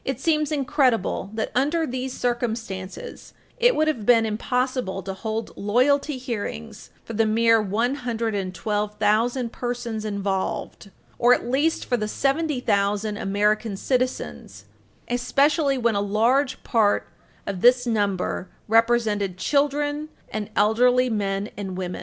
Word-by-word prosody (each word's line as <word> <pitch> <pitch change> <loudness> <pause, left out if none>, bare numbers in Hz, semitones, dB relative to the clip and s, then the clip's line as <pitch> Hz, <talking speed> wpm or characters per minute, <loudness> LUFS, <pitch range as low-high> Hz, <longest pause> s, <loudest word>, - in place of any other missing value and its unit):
242 265 -2 -3
seems 305 -1 0
incredible 270 -9 +1
that, 220 - -2
under 300 +6 +1
these 255 -1 -4
circumstances, 235 - -4 0.2
it - - +4
would 310 - +2
have 290 -9 -1
been 230 0 +5
impossible 245 -2 -1
to 195 +1 -4
hold 220 +3 -4
loyalty 265 +7 +1
hearings 230 -3 -6
for 230 - -8
the 225 +1 +2
mere 225 +1 +4
112,000 220 0 -1
persons 240 -3 -4
involved 200 0 -3 0.3
or 245 +1 +6
at - - -6
least 285 +6 +1
for 245 - 0
the 215 -2 -2
70,000 220 -8 0
American 210 0 0
citizens 100 - -3 0.4
especially 275 +4 +2
when 235 -2 +1
a 200 - +1
large 235 +7 +1
part 215 -4 +2 0.4
of 195 -2 -4
this 245 +1 +5
number 200 -5 -1 0.2
represented 220 -4 +2
children 290 +5 0 0.2
and 215 -1 -4
elderly 250 +4 +3
men 200 -1 -1
and 190 -3 -5
women. 180 -1 -4
230 Hz, 125 wpm, -24 LUFS, 205-255 Hz, 0.4 s, or